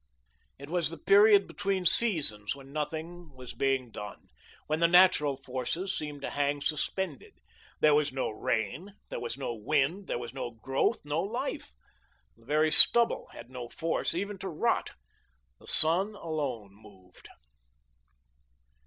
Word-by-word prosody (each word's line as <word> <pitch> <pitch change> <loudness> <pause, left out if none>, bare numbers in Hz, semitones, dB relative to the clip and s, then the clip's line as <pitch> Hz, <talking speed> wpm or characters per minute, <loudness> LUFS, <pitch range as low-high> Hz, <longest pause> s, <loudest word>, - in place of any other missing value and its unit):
It 140 +3 -13
was 175 -3 -2
the 165 - -10
period 200 +3 +3
between 195 -2 -5
seasons, 150 - +1
when 135 0 -16
nothing 160 +1 -8
was 130 -1 -12
being 135 -3 -3
done, 105 -2 -12 0.4
when 155 +1 -4
the 170 - +2
natural 175 -6 +2
forces 135 +9 -6
seemed 150 -2 -8
to - - -6
hang 145 0 -3
suspended. 155 +1 -5 0.5
There 155 -1 +3
was 150 -1 0
no 130 -3 -5
rain, 115 - -5
there - - -7
was 120 +1 -7
no 135 -3 -6
wind, 150 - -3
there - - -4
was 120 0 -10
no 130 -3 -7
growth, 135 +5 -4
no 150 +2 -3
life; 200 - -7 0.6
the 115 - -26
very 155 +2 0
stubble 235 +7 +7
had 120 +2 -14
no 125 -2 -10
force 165 +2 -4
even 200 +2 -6
to 190 +1 -7
rot. 155 - -3 0.7
The - - -20
sun 185 +7 +9
alone 140 - -7
moved. 95 -3 -20
150 Hz, 145 wpm, -27 LUFS, 130-175 Hz, 0.7 s, sun